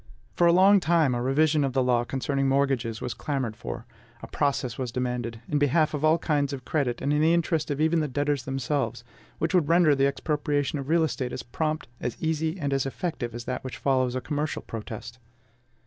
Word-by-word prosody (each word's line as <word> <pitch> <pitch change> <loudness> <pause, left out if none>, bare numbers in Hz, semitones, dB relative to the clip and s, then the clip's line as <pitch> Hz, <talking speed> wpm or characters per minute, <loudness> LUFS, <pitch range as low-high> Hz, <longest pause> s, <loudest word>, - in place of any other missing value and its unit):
For 175 - +3
a - - +6
long 195 +3 +6
time, 165 -6 +2
a 120 - -1
revision 150 +4 +2
of 135 -2 -1
the 130 0 +2
law 120 -1 +2
concerning 135 +2 -1
mortgages 135 -5 0
was 125 - -3
clamored 135 -7 -3
for; - - -6 0.4
a - - -6
process 135 -4 -1
was 130 -3 -4
demanded, 120 -2 -3
in 150 - 0
behalf 150 +3 +2
of 150 0 -3
all 155 +1 +5
kinds 145 -4 0
of 130 -3 -7
credit 130 -6 -1
and 140 +2 +1
in 150 - +2
the 165 +2 +4
interest 165 -2 0
of 145 -1 -2
even 160 +2 +3
the 155 - 0
debtors 145 0 0
themselves, 135 -3 -2 0.3
which 160 +3 -1
would 175 -6 +3
render 170 -3 +5
the 135 0 +3
expropriation 145 +1 -1
of 135 +1 -6
real 165 0 +4
estate 130 -5 -2
as - - -5
prompt, 155 +4 -2
as 125 - -4
easy, 160 +1 -1
and 140 -3 -1
as 135 0 0
effective 135 -6 -4
as 120 -1 -6
that 125 - -3
which 130 - -6
follows 130 -2 +1
a 130 - -1
commercial 150 +1 -3
protest. 115 +2 -7
140 Hz, 210 wpm, -26 LUFS, 125-155 Hz, 0.4 s, a